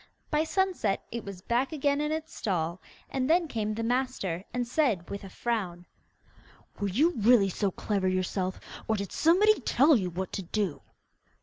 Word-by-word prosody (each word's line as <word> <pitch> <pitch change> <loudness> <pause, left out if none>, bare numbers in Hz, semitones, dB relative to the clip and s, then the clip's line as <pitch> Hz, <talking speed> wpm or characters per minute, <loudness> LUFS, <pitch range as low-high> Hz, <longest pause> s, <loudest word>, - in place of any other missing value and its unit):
By 305 +1 +2
sunset, 365 - 0
it 235 0 -4
was 195 -2 -8
back 245 +5 0
again 285 -1 +1
in 300 0 -1
its 315 0 -4
stall, 170 -3 -2 0.3
and 260 0 -1
then 335 +1 +4
came 215 -5 -2
the 230 - -3
master 240 -8 -1
and 245 -1 -2
said, 235 - +1
with 200 - -5
a 195 - -8
frown, 185 -6 -3 0.9
'Were 205 - 0
you 290 - +3
really 220 -2 +5
so 200 +2 0
clever 195 0 -1
yourself, 185 0 -1 0.3
or 220 - +2
did 200 -2 -4
somebody 400 +7 +4
tell 280 +4 +4
you 190 -6 0
what 185 +2 -5
to 200 - -2
do? 190 -3 -2
220 Hz, 175 wpm, -29 LUFS, 190-280 Hz, 0.9 s, really